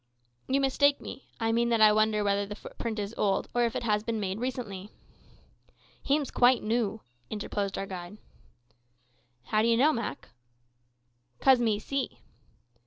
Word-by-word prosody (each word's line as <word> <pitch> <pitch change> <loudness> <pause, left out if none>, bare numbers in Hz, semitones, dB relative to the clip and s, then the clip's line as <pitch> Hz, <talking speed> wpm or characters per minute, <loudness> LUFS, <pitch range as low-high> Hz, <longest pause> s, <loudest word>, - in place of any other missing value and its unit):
"You 270 +1 +2
mistake 280 +1 +3
me. 270 - -9
I 225 -1 +1
mean 235 +1 +2
that 230 -1 +2
I 215 -1 +7
wonder 215 0 +2
whether 200 0 +1
the 205 - -6
footprint 225 +1 -6
is 205 +1 -3
old, 195 -2 +1
or 240 0 +3
if 230 - -2
it - - -2
has 210 -2 +1
been 225 0 -3
made 195 0 -3
recently." 225 -6 -4 1.1
"Him's 285 0 0
quite 245 0 +4
noo," 220 -1 -1 0.3
interposed 205 -2 -3
our 195 - -2
guide. 185 +1 -8 1.3
"How 215 +11 +1
d'ye 230 +1 +3
know, 290 +6 +4
Mak?" 230 -12 -5 1.1
"'Cause 265 -2 +5
me 225 -3 +2
see." 275 +5 -3
220 Hz, 155 wpm, -29 LUFS, 205-245 Hz, 1.3 s, I